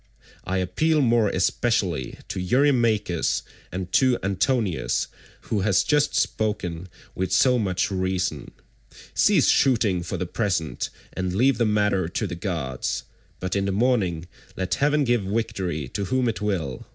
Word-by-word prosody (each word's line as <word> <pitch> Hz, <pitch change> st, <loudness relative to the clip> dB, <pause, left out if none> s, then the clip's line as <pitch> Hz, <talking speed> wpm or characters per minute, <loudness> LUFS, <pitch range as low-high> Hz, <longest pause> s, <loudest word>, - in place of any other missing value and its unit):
I 95 Hz, +1 st, -1 dB
appeal 150 Hz, -, +1 dB
more 115 Hz, -4 st, +3 dB
especially 95 Hz, -, 0 dB
to -, -, -3 dB
Eurymachus, 110 Hz, -, +2 dB, 0.3 s
and 90 Hz, -1 st, -5 dB
to 130 Hz, +1 st, +4 dB
Antinous 100 Hz, 0 st, 0 dB, 0.4 s
who 105 Hz, -, -2 dB
has 95 Hz, -2 st, +3 dB
just 150 Hz, -1 st, +2 dB
spoken 95 Hz, -5 st, -1 dB, 0.2 s
with 95 Hz, 0 st, -2 dB
so 125 Hz, +6 st, +4 dB
much 95 Hz, -3 st, 0 dB
reason. 95 Hz, -6 st, -1 dB, 0.6 s
Cease -, -, +4 dB
shooting 110 Hz, -9 st, +3 dB
for 90 Hz, +2 st, -4 dB
the 90 Hz, -, -2 dB
present 90 Hz, -, -2 dB, 0.2 s
and 90 Hz, -1 st, -2 dB
leave 125 Hz, +3 st, +3 dB
the 120 Hz, -, +3 dB
matter 105 Hz, -4 st, +1 dB
to -, -, -2 dB
the -, -, -4 dB
gods, 85 Hz, -, -3 dB, 0.4 s
but 95 Hz, +1 st, -3 dB
in 100 Hz, -1 st, +1 dB
the 100 Hz, -, 0 dB
morning 95 Hz, -7 st, +1 dB, 0.3 s
let 95 Hz, -1 st, -1 dB
heaven 150 Hz, +1 st, +2 dB
give 120 Hz, -3 st, +2 dB
victory 95 Hz, -7 st, -2 dB
to 100 Hz, +6 st, -3 dB
whom 130 Hz, +4 st, +1 dB
it 115 Hz, -, -2 dB
will. 90 Hz, -11 st, -2 dB
95 Hz, 145 wpm, -24 LUFS, 90-115 Hz, 0.6 s, to